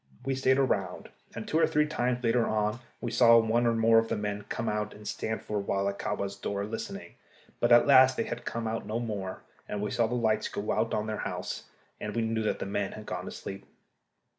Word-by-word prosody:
We 135 - 0
stayed 130 0 +3
around, 95 -9 0 0.3
and 115 - -6
two 160 - +1
or - - +5
three 150 0 +2
times 125 -4 -1
later 115 0 +2
on 105 +1 0 0.2
we 120 - -3
saw 115 0 +7
one 115 +1 +3
or 115 - +2
more 115 0 +5
of 115 - -1
the - - -1
men 105 0 -3
come 115 - -3
out 105 0 -2
and 105 0 -10
stand 110 0 -3
for 105 - -3
awhile 100 0 -1
at 100 0 -3
Kahwa's 100 0 -2
door 100 0 -3
listening; 110 +2 -6 0.5
but 120 - +2
at 120 - +8
last 130 -2 +7
they - - +1
came 115 -1 -4
out 110 +1 -3
no 110 +2 -1
more, 100 -5 -4 0.3
and 105 - -3
we 105 +1 -2
saw 120 -2 +2
the 120 - -2
lights 110 -3 +1
go 100 - -3
out 110 +1 0
in 105 - -1
their 110 -1 -3
house, - - -4 0.3
and 105 - -5
we 115 - +1
knew 110 0 0
that 110 - 0
the - - -4
men 100 0 -2
had 110 - -9
gone - - -4
to - - -6
sleep. 95 0 -7
110 Hz, 235 wpm, -29 LUFS, 105-120 Hz, 0.5 s, at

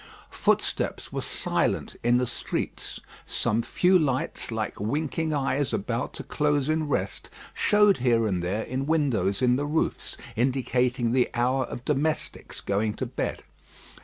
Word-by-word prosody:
Footsteps - - 0
were - - -1
silent - - 0
in 120 +1 +4
the 125 - +2
streets. 120 - -4 0.2
Some 110 +2 0
few 180 +9 +3
lights, 135 -5 -1
like 110 -2 -3
winking 155 +8 -1
eyes 140 -1 0
about 115 +4 -2
to - - -5
close 145 -2 +1
in 155 0 +1
rest, 145 - -2 0.2
showed 210 -1 +4
here 120 -3 +3
and 95 -4 0
there 95 +6 -1
in 130 +2 -3
windows 130 - +1
in 125 0 +4
the 145 - -1
roofs, 155 +2 -1 0.2
indicating 125 -1 +1
the 125 0 +3
hour 130 +2 +2
of 120 - -8
domestics 150 +2 -1
going 105 +2 0
to - - -3
bed. - - -3
130 Hz, 145 wpm, -27 LUFS, 115-145 Hz, 0.2 s, in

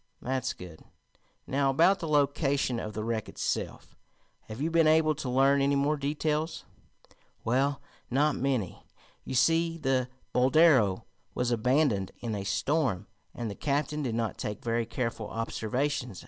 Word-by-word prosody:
"That's 130 0 -2
good. 90 -3 -11 0.6
Now 135 0 +1
about 170 +8 +4
the 165 - -4
location 140 -4 +1
of 105 - -5
the 110 +2 -4
wreck 110 -1 -2
itself. - - -4 0.5
Have 110 +2 -8
you 160 +4 -1
been 165 -1 +4
able 155 0 +4
to 140 -3 -5
learn 135 +2 +4
any 140 +1 +2
more 140 +2 +2
details?" 150 +2 -2 0.8
"Well, 135 +4 0 0.3
not 145 +3 +2
many. 125 -8 -1 0.4
You - - -4
see, 165 +5 +3
the 130 -4 0 0.2
Boldero 130 - +4 0.3
was 125 -1 0
abandoned 120 -4 +1
in 115 -2 -4
a 100 -2 -3
storm, 105 - 0 0.3
and 120 - -4
the 105 - -4
captain 150 +4 -1
did 120 -5 -2
not 115 -2 -2
take 105 -1 -5
very 115 -1 0
careful 115 -3 -3
observations. 125 +1 -2
135 Hz, 145 wpm, -29 LUFS, 115-150 Hz, 0.8 s, about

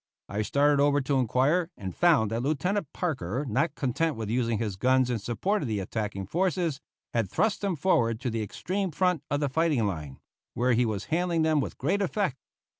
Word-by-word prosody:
I 100 +2 -2
started 140 +6 +3
over 145 0 +4
to 135 0 +1
inquire, 135 +8 +2
and 95 -2 -6
found 155 -12 +4
that 115 +1 -1
Lieutenant 155 +5 -1
Parker, 135 - -2
not 145 +7 0
content 150 +4 0
with 110 -1 -4
using 115 -2 +1
his 105 -3 -2
guns 130 +4 +2
in 120 - -1
support 185 - -1
of 140 - -2
the 110 -3 -1
attacking 100 -1 -3
forces, 170 - 0 0.3
had 115 -5 0
thrust 220 - +1
them 200 -3 0
forward 120 -9 +2
to 125 - -2
the 115 0 -2
extreme 185 - -2
front 180 -1 +1
of 145 +1 0
the 145 - +2
fighting 150 -4 +1
line, 75 -8 -4 0.4
where 125 +1 +2
he 120 +1 +3
was 105 -2 -3
handling 170 -1 +1
them 160 -1 +3
with - - -5
great 185 +10 0
effect. 190 -6 0
135 Hz, 195 wpm, -28 LUFS, 110-165 Hz, 0.4 s, over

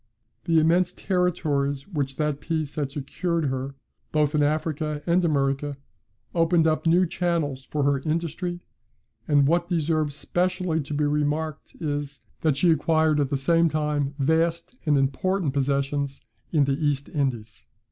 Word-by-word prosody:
The 165 -1 +3
immense 175 +3 +3
territories 150 -7 0
which 140 -8 -3
that 150 -1 -1
peace 155 -2 -2
had 145 -2 -2
secured 160 +4 -2
her, 135 0 -3 0.4
both 150 -1 +2
in 150 - +2
Africa 150 0 -1
and 175 +1 +3
America, 140 -2 0 0.6
opened 165 -1 +3
up 160 +1 +1
new 175 +3 +5
channels 160 -7 -1
for 150 -1 -2
her 140 0 +2
industry: 170 +4 -2 0.7
and 145 -2 +4
what 170 +3 +1
deserves 155 -3 0
specially 180 -1 0
to 145 +1 -5
be 150 - +1
remarked 150 +1 -1
is, 145 -2 -3 0.2
that 155 -4 +2
she 170 +3 +4
acquired 155 0 +2
at 140 -2 +1
the 140 - 0
same 165 +4 +3
time 150 -2 -1
vast 165 - +1
and 145 -1 +4
important 140 +4 0
possessions 140 0 -1 0.3
in 150 -4 +4
the 140 +3 0
East 140 -2 0
Indies." 120 - -3
150 Hz, 145 wpm, -25 LUFS, 140-165 Hz, 0.7 s, new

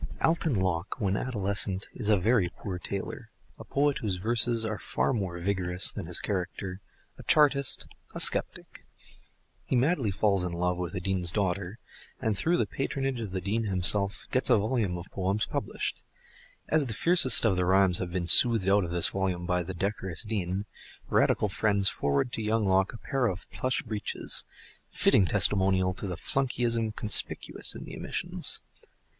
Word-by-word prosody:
Alton 160 -4 +1
Locke, 95 -1 -2
when 100 -4 0
adolescent, 100 -4 -1
is 105 - -5
a 105 - +4
very 100 -1 +1
poor 90 0 -7
tailor, 100 +2 -6 0.3
a - - -8
poet 145 0 0
whose 100 -4 -2
verses 115 +3 0
are 110 -2 -4
far - - -1
more 95 -7 -3
vigorous 90 0 0
than - - -7
his 90 - -3
character, 95 0 -4 0.4
a - - -10
chartist, 140 -3 +3 0.3
a - - -4
sceptic. - - +2 0.8
He - - -2
madly 130 - +1
falls 100 -1 +1
in 90 -1 -4
love 90 +1 -1
with 90 +2 -5
a - - -2
Dean's 90 -2 +3
daughter, 95 0 -2 0.4
and 110 -4 -1
through 170 - 0
the - - +1
patronage 135 -2 -3
of 110 - -5
the 95 0 -4
Dean 110 +4 -2
himself, 100 +1 +2
gets 130 - +1
a - - +5
volume 105 -4 -1
of 85 - -7
poems 95 +2 -1
published. - - -4 0.7
As 155 -3 +1
the 110 - -4
fiercest 165 -8 +4
of 105 -4 +3
the 90 0 0
rhymes 95 -1 +3
have 90 -2 -4
been 90 -1 -2
soothed 105 +4 +8
out 100 +1 +3
of 85 - -4
this 85 0 +2
volume 95 -2 -3
by 90 0 0
the 90 +2 -6
decorous 95 -2 -3
Dean, 100 -2 -3 0.4
Radical 105 - +2
friends 100 0 +1
forward 70 - -1
to - - -3
young 110 0 0
Locke 95 +2 +1
a - - -8
pair 135 +1 -1
of 90 -3 -5
plush 130 0 -1
breeches—fitting 105 -2 -1
testimonial 95 -1 +2
to 100 - -6
the 90 -3 -5
flunkeyism 120 -4 -1
conspicuous 105 - +2
in - - -8
the - - -9
omissions. - - -1
100 Hz, 170 wpm, -27 LUFS, 90-115 Hz, 0.8 s, soothed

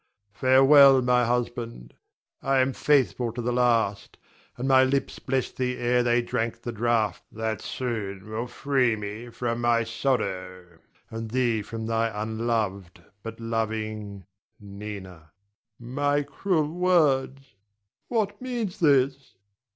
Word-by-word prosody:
Farewell, 135 +3 +6
my 125 0 +3
husband; 115 - -3 0.5
I 135 0 +1
am 130 0 +2
faithful 130 -5 +1
to 125 - -7
the 120 +1 -1
last, 115 -5 +1 0.4
and 125 +2 -3
my 130 -1 +6
lips 135 +1 -1
blessed 130 -1 -2
thee 125 -1 -1
ere 125 0 +2
they 120 0 +2
drank 115 0 -3
the 120 - -3
draught 115 -3 0
that 110 0 -3
soon 105 -6 -4
will 110 +3 -4
free 125 -1 +1
me 105 +3 -7
from 120 0 -3
my 120 -1 +2
sorrow, 95 -8 -3 0.3
and 115 0 -5
thee 120 -2 +1
from 110 +2 -6
thy 115 0 0
unloved 110 -4 -2 0.2
but 115 +2 -8
loving 110 -3 -4 0.3
Nina. 100 -1 -8
Adrian. 85 -4 -15 0.7
My 145 0 +1
cruel 160 -1 -1
words? 140 -8 +1 0.5
What 215 -3 -1
means 235 -6 -4
this? 140 -3 +2
120 Hz, 130 wpm, -26 LUFS, 110-135 Hz, 0.7 s, Farewell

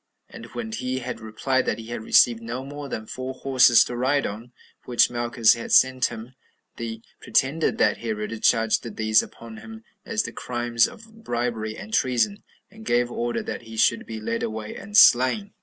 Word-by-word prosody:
and - - -11
when 225 -2 -5
he 130 -11 -3
had 125 -2 -5
replied 115 +4 -1
that - - 0
he 115 0 -10
had 120 - -5
received 115 +1 +4
no 120 +3 -5
more 145 0 -8
than 110 - -5
four 130 +3 -6
horses 130 -3 +5
to 120 - -6
ride 135 +4 +1
on, 115 +4 -7 0.3
which 120 -1 +3
Malchus 120 -1 +3
had 115 - -7
sent 130 -1 +4
him; 115 +2 -6 0.4
they 115 -1 -6 0.2
pretended 145 +5 +1
that 105 - +2
Herod 110 -1 -4
charged 115 0 +1
these 110 0 +4
upon 115 -1 -11
him 225 - -11 0.2
as 225 -1 -1
the - - -6
crimes 120 -1 0
of 225 0 -15
bribery 115 - -3
and 220 - -10
treason, 135 - +1 0.3
and 220 +2 -14
gave 120 - +1
order 120 0 -2
that - - -5
he 115 -1 -11
should 115 - +2
be 110 -1 -6
led 115 +2 -3
away 110 -1 -5
and 205 +1 -3
slain. 130 - +5
120 Hz, 185 wpm, -24 LUFS, 115-130 Hz, 0.4 s, horses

